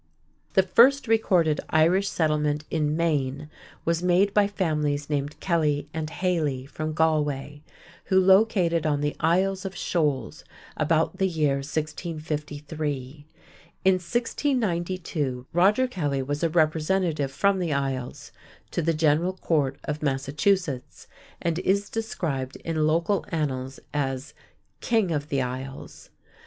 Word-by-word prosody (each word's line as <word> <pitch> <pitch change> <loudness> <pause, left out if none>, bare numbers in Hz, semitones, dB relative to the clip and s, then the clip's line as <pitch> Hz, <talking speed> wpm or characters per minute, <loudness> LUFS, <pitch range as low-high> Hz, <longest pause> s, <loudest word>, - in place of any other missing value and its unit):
The 190 - +6
first 245 +9 +5
recorded 180 -9 +3
Irish 175 +5 +3
settlement 150 -2 0
in 155 -1 0
Maine 150 -3 -1 0.3
was 170 0 +1
made 180 +3 +3
by 205 -1 +4
families 150 -7 -1
named 145 0 -2
Kelly 150 -5 0
and 155 -1 -3
Haley 155 -7 -1
from 155 +3 -4
Galway, 150 -2 0 0.4
who 190 - +4
located 185 -4 +4
on 145 -1 +1
the 145 0 -1
Isles 185 +4 +1
of 195 -1 -5
Shoals 145 -9 -1 0.3
about 155 +1 +1
the 190 - +2
year 155 -6 +1
1653. 150 -1 -4 0.6
In 190 - +6
1692, 180 - -1
Roger 205 +9 +4
Kelly 145 - -2
was 145 +2 -3
a 165 - +2
representative 160 -1 +1
from 195 +7 +2
the 175 -3 -1
Isles 135 -3 -3 0.4
to - - -1
the 165 0 +1
General 160 +4 +2
Court 150 -7 0
of 150 0 -4
Massachusetts, 145 +1 -1 0.3
and 170 0 -1
is 200 +2 0
described 150 -12 -3
in 155 -2 +1
local 170 +5 +1
annals 135 -5 -3
as 135 -1 -2 0.5
"King 220 -7 +1
of 150 -1 -2
the 140 -2 +1
Isles." 130 +2 -7
155 Hz, 125 wpm, -25 LUFS, 145-180 Hz, 0.6 s, The